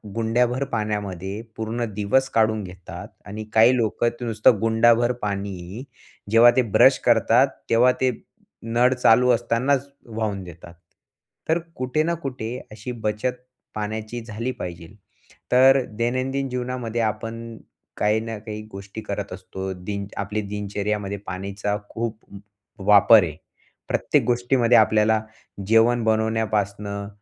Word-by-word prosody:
गुंड्याभर 120 Hz, +3 st, +1 dB
पाण्यामध्ये 105 Hz, -2 st, -3 dB
पूर्ण 115 Hz, +2 st, -3 dB
दिवस 120 Hz, +7 st, +1 dB
काढून 110 Hz, -1 st, +2 dB
घेतात 90 Hz, -1 st, -9 dB, 0.2 s
आणि 105 Hz, +1 st, -6 dB
काही 115 Hz, +3 st, +6 dB
लोकं 115 Hz, 0 st, +1 dB
ते 125 Hz, -, -4 dB
नुसतं 110 Hz, -1 st, +3 dB
गुंडाभर 115 Hz, +1 st, +4 dB
पाणी 100 Hz, +1 st, -4 dB, 0.5 s
जेव्हा 115 Hz, +2 st, +7 dB
ते 130 Hz, -, +4 dB
ब्रश 130 Hz, +6 st, +6 dB
करतात 120 Hz, +2 st, +4 dB, 0.2 s
तेव्हा 120 Hz, +2 st, +5 dB
ते 130 Hz, -1 st, +3 dB, 0.5 s
नळ 120 Hz, +3 st, +2 dB
चालू 125 Hz, 0 st, +4 dB
असतानाच 125 Hz, +4 st, +1 dB, 0.2 s
वाहून 110 Hz, -4 st, -3 dB
देतात. 85 Hz, -1 st, -12 dB, 0.8 s
तर 165 Hz, -, +3 dB, 0.2 s
कुठे 130 Hz, +5 st, 0 dB
ना 170 Hz, +2 st, 0 dB
कुठे 125 Hz, -3 st, -4 dB
अशी 110 Hz, +4 st, -7 dB
बचत 105 Hz, +4 st, -1 dB, 0.4 s
पाण्याची 110 Hz, +2 st, -4 dB
झाली 115 Hz, +3 st, -4 dB
पाहिजे. 85 Hz, -1 st, -6 dB, 0.6 s
तर 130 Hz, +2 st, +6 dB, 0.2 s
दैनंदिन 130 Hz, +3 st, -1 dB
जीवनामध्ये 125 Hz, -2 st, -3 dB
आपण 115 Hz, +1 st, -4 dB, 0.4 s
काही 105 Hz, +1 st, +2 dB
ना 115 Hz, 0 st, -5 dB
काही 105 Hz, 0 st, -7 dB
गोष्टी 100 Hz, +2 st, -8 dB
करत 100 Hz, -2 st, -5 dB
असतो. 95 Hz, +1 st, -6 dB
दिन 100 Hz, +2 st, -5 dB
आपल्या 105 Hz, +2 st, -2 dB
दिनचर्येमध्ये 105 Hz, 0 st, -3 dB
पाण्याचा 100 Hz, +2 st, -3 dB
खूप 115 Hz, -1 st, -4 dB, 0.7 s
वापर 105 Hz, +1 st, +7 dB
आहे. 80 Hz, -4 st, -4 dB, 0.5 s
प्रत्येक -, -, +1 dB
गोष्टीमध्ये 120 Hz, 0 st, +3 dB
आपल्याला 110 Hz, 0 st, +3 dB, 0.5 s
जेवण 115 Hz, +2 st, +4 dB
बनवण्यापासनं, 105 Hz, -2 st, -1 dB
110 Hz, 120 wpm, -23 LUFS, 105-120 Hz, 0.8 s, जेव्हा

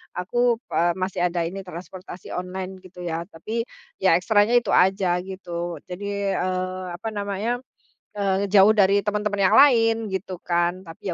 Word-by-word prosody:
Aku, 240 Hz, +6 st, +1 dB, 0.2 s
eee, 170 Hz, 0 st, +2 dB
masih 185 Hz, 0 st, -3 dB
ada 170 Hz, -1 st, -1 dB
ini, 175 Hz, +4 st, -4 dB
transportasi 180 Hz, +1 st, -9 dB
online, 185 Hz, +1 st, -5 dB
gitu 185 Hz, -1 st, -12 dB
ya. 170 Hz, 0 st, -3 dB
Tapi, 220 Hz, +6 st, -4 dB, 0.3 s
ya 190 Hz, -3 st, +4 dB
ekstranya 205 Hz, +5 st, +3 dB
itu 240 Hz, -, +2 dB
aja, 185 Hz, -1 st, +3 dB
gitu, 175 Hz, -2 st, -5 dB
jadi, 200 Hz, +2 st, -3 dB
eee, 185 Hz, 0 st, -2 dB
apa 220 Hz, +5 st, -5 dB
namanya, 205 Hz, +3 st, -2 dB, 0.6 s
eee, 195 Hz, -1 st, +1 dB
ngejauh 200 Hz, +1 st, +5 dB
dari 200 Hz, -1 st, +4 dB
teman-teman 205 Hz, -1 st, 0 dB
yang -, -, +3 dB
lain, 230 Hz, -5 st, +6 dB, 0.2 s
gitu 190 Hz, 0 st, -4 dB
kan. 175 Hz, +1 st, 0 dB
Tapi, 165 Hz, +2 st, -10 dB
190 Hz, 150 wpm, -24 LUFS, 180-205 Hz, 0.6 s, lain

